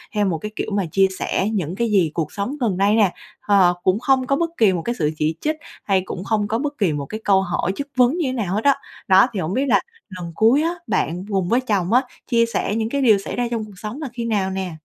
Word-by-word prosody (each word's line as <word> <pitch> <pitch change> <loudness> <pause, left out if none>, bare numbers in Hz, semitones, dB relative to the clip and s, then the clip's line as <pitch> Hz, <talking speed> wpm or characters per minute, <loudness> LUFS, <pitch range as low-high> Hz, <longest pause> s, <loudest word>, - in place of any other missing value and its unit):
theo 210 -1 +2
một 180 -4 0
cái 210 +7 -6
kiểu - - -3
mà 200 -2 0
chia 195 +2 +4
sẻ 195 - 0
những 180 -4 -2
cái 235 +2 0
gì 180 -7 +3
cuộc 160 -3 -2
sống 225 +9 -3
gần 210 -7 0
đây 200 +2 +3
nè. 205 -5 +3 0.3
Ờ, 190 -4 +4
cũng 185 +3 +2
không 260 0 +2
có 275 - +2
bất 335 +3 0
kỳ 210 -4 +4
một 175 - -2
cái 235 +7 -3
sự 150 -2 +1
chỉ 155 +1 0
trích 310 +1 0 0.3
hay 195 -2 +2
cũng 180 - -6
không 210 0 0
có 225 +2 -1
bất 290 +1 -3
kỳ 195 -8 +1
một 145 -1 -3
cái 215 +9 -6
câu 195 -1 +4
hỏi 180 0 -1
chất 280 - -4
vấn 255 +5 +3
như 335 -6 0
thế - - -2
nào 200 -7 -2
hết 215 - -1
á. 280 -1 +5 0.3
Đó 190 +4 +6
thì 205 - -2
hông 160 +1 -2
biết 265 +5 +1
là - - +4 0.3
lần 180 -3 -7
cuối 230 +7 +4
á, 335 +2 0
bạn 175 +4 -1
cùng 190 -3 0
với 245 +2 +3
chồng 205 -5 0
á, 250 - +6 0.3
chia 230 -2 +3
sẻ 230 -2 -2
những 220 0 -1
cái 280 +3 -1
điều 225 -6 +5
xảy 195 - -6
ra 245 -1 0
trong 225 -2 -2
cuộc 200 -3 -14
sống 215 +10 -6
là 285 - -4
khi 235 -1 -4
nào 205 -4 0
nè? 190 -1 -3
210 Hz, 285 wpm, -21 LUFS, 185-240 Hz, 0.3 s, Đó